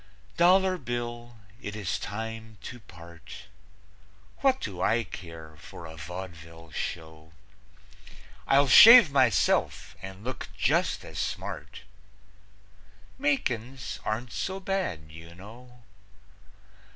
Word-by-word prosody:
Dollar 185 +1 +4
Bill, 120 -1 -5 0.2
it 100 - -6
is 100 -4 -3
time 110 0 -6
to 125 - -8
part. 85 -2 -13 0.9
What 265 -1 +2
do 95 -4 -6
I 115 +4 +2
care 80 -6 -10
for 85 +3 -11
a 80 0 -10
vaudeville 85 -1 -9
show? 80 0 -6 1.1
I'll 140 +1 +4
shave 230 - +10
myself 140 - +1
and 95 +1 -9
look 130 +2 -6
just - - +1
as - - -8
smart. - - -5 1.4
Makin's 125 -4 -2
aren't 115 +2 -3
so 190 - -3
bad, 185 - -3
you 80 +1 -12
know. 120 +6 -14
110 Hz, 105 wpm, -27 LUFS, 85-125 Hz, 1.4 s, shave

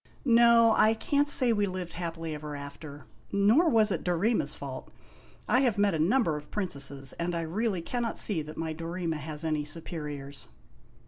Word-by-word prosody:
No; 235 -2 +6
I 220 +1 +4
can't 285 +5 +1
say 255 -5 +4
we 205 -2 +1
lived 185 -2 -5
happily 165 -2 -5
ever 150 0 -6
after. 145 +1 -9 0.3
Nor 220 - +4
was 220 -4 +4
it - - -2
Dorema's 185 +6 0
fault. - - -7 0.6
I 250 - +3
have 245 -6 +1
met 200 -1 +2
a 160 - -1
number 170 - +2
of 150 - -11
princesses, 140 -8 -1
and 170 +1 -2
I 170 - -1
really 185 +2 -2
cannot 235 +3 -3
see 190 -7 -1
that 155 +1 -9
my 160 -1 -3
Dorema 165 0 -4
has 150 +1 -5
any 155 -2 0
superiors." 145 -3 -4
170 Hz, 175 wpm, -28 LUFS, 155-220 Hz, 0.6 s, No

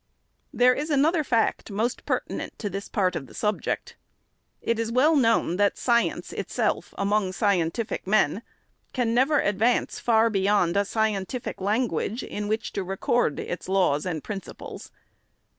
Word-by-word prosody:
There 250 +1 +4
is 295 +4 -3
another 310 +3 +3
fact, 230 -5 0
most 220 +5 -2
pertinent - - -3
to 205 -3 -4
this 200 +1 -5
part 185 -2 +1
of 135 - -4
the - - -15
subject. 210 -1 -2 0.6
It 230 -1 -1
is 230 0 -1
well 285 +7 +4
known 230 - +2
that 205 0 +2
science 235 -1 +1
itself, - - -2
among 200 -1 +1
scientific 200 +1 0
men, 205 -1 +2 0.5
can 240 -3 0
never 270 +5 +3
advance 220 +5 +1
far 230 -1 +3
beyond 195 -3 +2
a 200 0 +2
scientific 220 +1 -2
.language 215 +1 -1
in 210 0 -4
which 220 +2 -2
to 195 - -2
record 195 -1 0
its 180 - -5
laws 185 -5 +2
and 160 -4 -3
principles. 200 -3 -8
215 Hz, 145 wpm, -25 LUFS, 195-235 Hz, 0.6 s, There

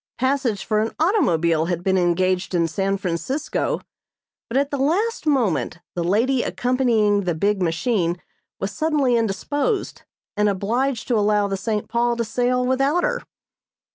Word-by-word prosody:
Passage 260 -5 0
for 215 -2 +1
an 220 +1 -2
automobile 170 - +2
had 175 0 -2
been 190 0 +2
engaged 185 +1 +1
in 170 -1 +2
San 195 +4 -1
Francisco, 200 - -2 0.7
but 240 - 0
at 280 +1 +1
the 280 - -2
last 360 - 0
moment 240 - +1 0.2
the 175 - -2
lady 235 +9 +2
accompanying 230 -7 +1
the 175 -2 0
big 200 +4 0
machine 175 0 0 0.4
was 195 - -2
suddenly 285 0 +1
indisposed 285 - -1 0.3
and 210 0 +2
obliged 230 +6 -1
to 235 -3 +3
allow 210 0 +2
the 195 - -2
"St. 210 +1 -2
Paul" 235 +1 +1
to 235 - -1
sail 250 +3 0
without 270 +7 +1
her. - - 0
220 Hz, 150 wpm, -22 LUFS, 190-260 Hz, 0.7 s, to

